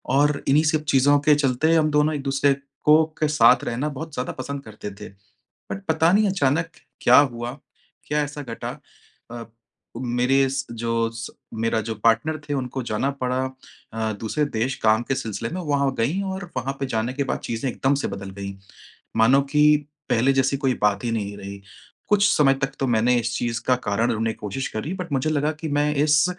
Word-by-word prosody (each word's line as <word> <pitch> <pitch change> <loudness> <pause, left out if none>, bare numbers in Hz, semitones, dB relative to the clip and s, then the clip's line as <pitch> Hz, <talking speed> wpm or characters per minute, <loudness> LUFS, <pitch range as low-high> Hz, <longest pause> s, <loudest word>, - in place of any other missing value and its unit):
और 145 +1 +2
इन्हीं 145 +3 +4
सब 155 -1 +1
चीज़ों 145 +2 +4
के 150 - +7
चलते 145 +3 +2
हम 155 -1 +3
दोनों 150 +1 +2
एक 145 - -3
दूसरे 140 0 +2 0.3
को 155 +1 +6 0.2
के 155 - +2
साथ 125 -4 +5
रहना 130 +6 -2
बहुत 150 +2 -7
ज़्यादा 125 -2 -3
पसंद 140 +1 -6
करते 110 -2 -8
थे। 105 - -7 0.6
बट 195 - -5
पता 160 +1 +3
नहीं 210 +1 +4
अचानक 165 -3 +1 0.3
क्या - - +7
हुआ, 120 -4 +1 0.5
क्या 150 0 0
ऐसा 145 0 -7
घटा 115 -3 -6 0.5
अ, 120 -1 -6 0.5
मेरे 125 +2 +2
इस 135 0 -2
जो 115 0 -1
स 115 0 -6 0.2
मेरा 115 0 0
जो 110 +1 -4
पार्टनर 155 +8 +2
थे, 145 - -1
उनको 130 -1 -3
जाना 115 +4 -1
पड़ा 130 +1 0 0.5
अ, 110 -1 -2
दूसरे 130 +7 0
देश 130 -1 -1
काम 110 +1 +4
के 135 - +2
सिलसिले 110 -1 -4
में, 185 - -3
वहाँ 140 -3 0
गई 145 +13 +1
और 190 -2 -6
वहाँ 130 +2 -2
पे 135 - -1
जाने 115 0 -1
के 140 +1 -1
बाद - - -2
चीज़ें 115 +3 -1
एकदम 135 +4 +1
से 140 - -2
बदल 100 0 -6
गईं। 100 0 -6 0.6
मानो 125 +5 +5
कि 150 0 +5 0.4
पहले 125 +4 +3
जैसी 135 +1 +2
कोई 135 -2 0
बात 105 0 +2
ही 120 - 0
नहीं 100 -2 -3
रही, 100 0 -8 0.5
कुछ 205 0 +4
समय 135 -2 +5
तक 135 0 -1
तो 135 - +1
मैंने 120 0 +3
इस 120 +1 -3
चीज़ 120 -1 -2
का 130 - +4
कारण 105 +3 +1
ढूँढ़ने 115 0 -1
कोशिश 105 +6 -4
करी 110 +10 -4
बट 180 -3 -6
मुझे 135 +3 0
लगा 150 0 +1
कि 160 - -3
मैं 145 0 +1
इस 150 0 +4
135 Hz, 200 wpm, -23 LUFS, 115-150 Hz, 0.6 s, के